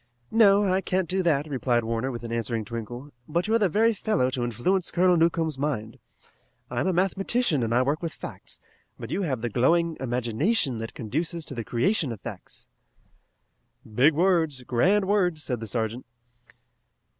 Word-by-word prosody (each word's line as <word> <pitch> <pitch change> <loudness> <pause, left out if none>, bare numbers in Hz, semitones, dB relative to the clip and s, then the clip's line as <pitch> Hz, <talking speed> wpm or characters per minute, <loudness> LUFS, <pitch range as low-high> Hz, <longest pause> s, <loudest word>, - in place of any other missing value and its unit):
"No, 205 -3 +5
I 190 -1 +1
can't 185 -1 -1
do 190 +2 0
that," 155 -5 +1
replied 125 -5 0
Warner, 115 +3 -2
with 120 -2 -6
an 115 - -6
answering 115 -1 -2
twinkle, 120 +5 -7 0.2
"but 170 +5 -1
you're 225 +1 +3
the 200 -4 +2
very 225 +6 +3
fellow 195 - 0
to 125 -1 -2
influence 120 - 0
Colonel 180 +1 +3
Newcomb's 165 -3 +1
mind. 125 -7 -3 0.7
I'm 125 +8 -1
a - - +3
mathematician 190 - +1
and 115 -1 -1
I 125 +2 +3
work 145 +4 -1
with 165 -2 -3
facts, - - -9 0.4
but 115 - -8
you 195 - -1
have 135 - -2
the 120 - -2
glowing 165 +8 +2
imagination 125 - 0
that 115 0 -6
conduces 160 - -2
to - - -6
the 115 -3 -4
creation 130 - 0
of 110 - -6
facts." 100 -3 -9 1.3
"Big 140 +7 +4
words! 165 -6 +2
Grand 190 +13 +2
words!" 180 -6 +1
said 125 -3 -2
the 115 - -6
sergeant. 115 +3 -2
145 Hz, 170 wpm, -26 LUFS, 120-185 Hz, 1.3 s, No